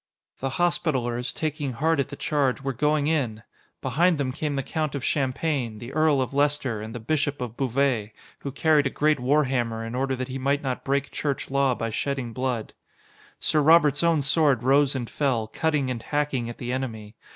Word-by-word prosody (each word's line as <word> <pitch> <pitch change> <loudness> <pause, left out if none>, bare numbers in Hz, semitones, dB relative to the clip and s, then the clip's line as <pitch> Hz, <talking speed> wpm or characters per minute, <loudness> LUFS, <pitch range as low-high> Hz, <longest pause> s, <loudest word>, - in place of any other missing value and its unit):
The 135 0 -3
Hospitallers, 130 -9 0
taking 150 -4 -3
heart 160 +5 +1
at 140 - 0
the 145 - -6
charge, 140 -3 0
were 135 0 -1
going 150 +3 +1
in! 130 -9 0 0.4
Behind 175 +2 +2
them 135 -3 -1
came 150 +1 -3
the 135 - -1
Count 155 +1 -2
of 140 - -3
Champagne, 135 -4 -1
the 120 +4 -8
Earl 155 -3 +3
of 130 - -7
Leister, 140 -6 +1
and 110 +2 -7
the - - -4
Bishop 145 +4 -1
of 120 -3 -5
Beauvais, 125 -4 0 0.3
who 140 - -5
carried 150 0 +3
a - - -1
great 150 +1 +1
warhammer 125 -4 +1
in 115 - -6
order 130 +1 0
that 130 0 -4
he 130 +1 -4
might 140 +3 0
not 130 -2 -3
break 140 +1 0
Church 140 -2 -3
Law 140 -2 +2
by 115 -1 -3
shedding 130 0 -2
blood. 125 -3 -2 0.7
Sir 155 - +2
Robert's 150 -2 +5
own 165 -3 +3
sword 135 -3 +3
rose 140 +1 +4
and 120 -3 -3
fell, 130 -6 0
cutting 145 +3 0
and 120 -2 -4
hacking 140 -3 -1
at 120 - -8
the 120 0 -4
enemy. 115 -5 -4
135 Hz, 195 wpm, -25 LUFS, 125-150 Hz, 0.7 s, Robert's